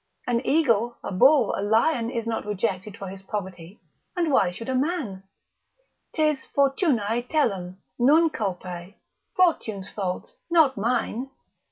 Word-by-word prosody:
an 240 0 0
eagle, 240 -6 +2
a - - -4
bull, 255 +4 +5
a - - -3
lion 230 +4 +2
is 235 -2 -3
not 230 -1 -2
rejected 210 0 -3
for 195 - -7
his 190 0 -9
poverty, 190 -2 -6 0.4
and 340 -4 0
why 195 -9 +4
should 215 +6 -8
a 260 - -1
man? 260 - -1 0.9
'Tis 305 -3 +1
fortunae 270 - +1
telum, 195 - 0 0.2
non 310 +6 +5
culpae, 180 -3 -5 0.4
fortune's 225 - +1
fault, 200 - -4
not 320 -6 +4
mine. 240 +3 -1
230 Hz, 135 wpm, -25 LUFS, 195-280 Hz, 0.9 s, bull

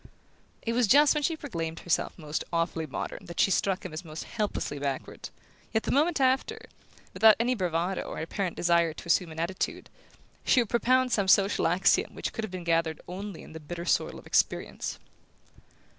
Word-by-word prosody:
It 230 - -1
was 240 -1 +2
just 290 +7 +6
when 300 - -1
she 320 +2 0
proclaimed 165 - -5
herself 175 - -1
most 150 -3 -3
awfully 165 -1 -1
modern 180 +6 -6
that 170 - -8
she 195 - +4
struck 195 0 0
him - - -6
as 155 - -5
most 155 -1 -7
helplessly 210 -9 -3
backward; 140 -2 -4 0.5
yet 220 - +2
the - - -2
moment 310 +3 +2
after, 270 +13 +1 0.5
without 220 -1 +7
any 245 +2 +2
bravado, 180 -3 -1
or - - -7
apparent 175 +2 -3
desire 170 -2 +2
to - - -10
assume 170 0 +2
an 160 - -8
attitude, 175 +3 -3 0.5
she 255 - +4
would 235 -4 0
propound 255 +2 +2
some 200 -4 +1
social 195 +1 +4
axiom 180 +4 +2
which - - -4
could 225 - -4
have 220 - -3
been 180 -1 -6
gathered 165 -2 +1
only 195 0 -7
in - - -13
the 160 - -7
bitter 170 +3 -7
soil - - +1
of - - -13
experience. - - 0
185 Hz, 190 wpm, -28 LUFS, 165-230 Hz, 0.5 s, without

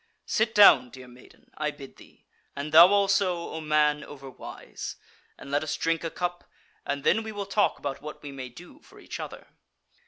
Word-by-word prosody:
Sit 220 0 0
down, 150 -12 +7
dear 130 +1 -12
maiden, 125 0 -19
I 150 0 -1
bid 140 -2 -11
thee; - - -19 0.3
and 145 +2 -5
thou 165 +3 +10
also, 195 -3 +1
O 160 - -5
man 150 -1 +2
overwise; 135 -2 -9 0.4
and 140 - -11
let 145 +1 +1
us 155 - -3
drink 165 0 -1
a 165 - -2
cup, 175 +1 -4 0.4
and 140 0 -2
then 225 - +3
we 220 0 -6
will 205 -1 -5
talk 200 +1 +1
about 140 -1 -5
what 150 +1 -9
we 145 - -7
may 130 -2 -7
do 170 +9 -14
for - - -19
each - - -8
other." - - -8
150 Hz, 190 wpm, -27 LUFS, 140-180 Hz, 0.4 s, thou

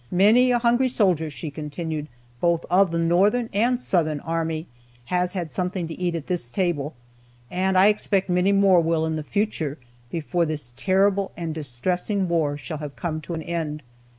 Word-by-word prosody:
Many 220 +7 +5
a 245 - +4
hungry 240 +2 +3
soldier,' 180 -10 +2
she 150 +1 -6
continued, 150 +1 -5 0.3
'both 170 +1 +1
of 190 +1 +5
the 170 - -2
Northern 195 +8 +2
and 240 +5 +2
Southern 155 -10 +1
army, 165 -1 -2 0.5
has 180 0 +1
had 175 -5 -4
something 180 +3 -2
to 165 - -6
eat 175 -2 -1
at 160 -3 -4
this 175 -9 -2
table, 155 -1 -1 0.6
and 185 +1 +1
I 185 - +7
expect 205 -2 +2
many 180 +2 +2
more 195 -2 +5
will 165 -1 +1
in 160 0 -1
the 155 - -2
future, 160 -5 -2 0.3
before 170 +2 -1
this 145 -6 -3
terrible 195 +6 +2
and 165 -2 -3
distressing 180 - -1
war 155 -4 0
shall 150 +2 -6
have 150 -2 -7
come 155 -3 -3
to 170 +2 -5
an 160 - -5
end.' 155 -3 -3
170 Hz, 180 wpm, -24 LUFS, 155-190 Hz, 0.6 s, I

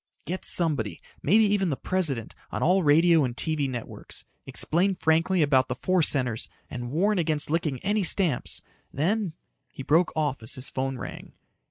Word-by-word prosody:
"Get 185 +2 -4
somebody 145 - +1 0.2
maybe 215 +8 +4
even 200 -3 +1
the 140 - 0
President 150 -12 -2 0.2
on - - -3
all 185 +3 +4
radio 165 +1 +5
and 125 -2 -3
TV 155 -4 0
networks. 120 -3 -7 0.2
Explain 185 +4 +1
frankly 165 +2 +2
about 130 -3 +3
the - - -3
four 185 -1 +1
centers 125 -7 +1 0.2
and 120 -1 -5
warn 190 +8 +1
against 155 -3 0
licking 155 -4 0
any 205 +1 0
stamps. 170 -7 +1 0.3
Then 185 +4 -1 0.2
" - - -47
He 135 - -8
broke 165 +5 +3
off 145 -5 -1
as 110 - -1
his 130 +1 -2
phone 135 0 -3
rang. - - -8
155 Hz, 170 wpm, -26 LUFS, 135-185 Hz, 0.3 s, radio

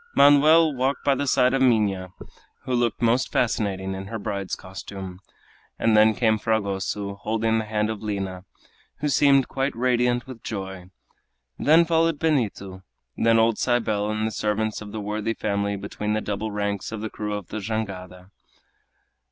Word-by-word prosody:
Manoel 150 +3 +6
walked 130 +2 -1
by 140 - +3
the 140 +1 -2
side 130 -1 +3
of 135 - +1
Minha, 105 -7 +2 0.5
who 130 - -3
looked 120 -1 0
most 120 +3 +2
fascinating 95 -5 0
in 95 0 -6
her 115 - -4
bride's 100 -3 -3
costume, 95 0 -8 0.6
and 115 -1 +2
then 110 0 +5
came 110 -2 +2
Fragoso, 100 -2 -1
holding 110 +2 0
the 110 - -3
hand 105 0 -1
of 110 - -6
Lina, 95 -3 -4 0.6
who 150 - 0
seemed 140 -1 +4
quite 135 +1 -2
radiant 125 0 +1
with 130 -3 -10
joy. 95 -3 -6 0.7
Then 160 +3 +5
followed 165 -1 +2
Benito, 110 -12 -1 0.3
then 115 0 +3
old 115 -1 +3
Cybele 110 -4 0
and 110 0 -1
the 110 - -1
servants 105 +1 -1
of 105 -1 -8
the 110 - -5
worthy 105 +2 -2
family 100 -1 -1
between 105 +1 -4
the 110 - +1
double 105 +1 -3
ranks 100 -1 -3
of 110 -2 -5
the 110 - -3
crew 105 -1 -4
of 105 -3 -7
the 110 - -4
jangada. 95 -3 -5
110 Hz, 165 wpm, -24 LUFS, 100-125 Hz, 0.7 s, Manoel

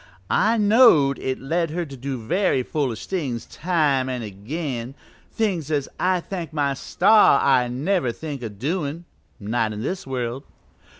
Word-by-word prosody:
I've 225 +1 +3
knowed 205 - +5
it 130 0 -2
lead 165 +5 -1
her 170 +3 -3
to 140 -3 -10
do 135 +1 -4
very 140 - 0
foolish 130 -6 -2
things 135 - -3
time 150 -7 0
an' 125 -2 -3
again 120 - -5 0.4
things 185 - -1
as 145 -3 0
I 185 0 +2
thank 170 -3 -6
my 145 -3 0
star 190 +3 +4
I'd 125 -3 +3
never 145 +1 0
think 145 +1 -7
o' 115 - -4
doin' 150 - -3 0.3
not 110 +1 -1
in 105 +1 -5
this 185 -2 -4
world." 125 -1 -3
140 Hz, 155 wpm, -23 LUFS, 125-175 Hz, 0.4 s, knowed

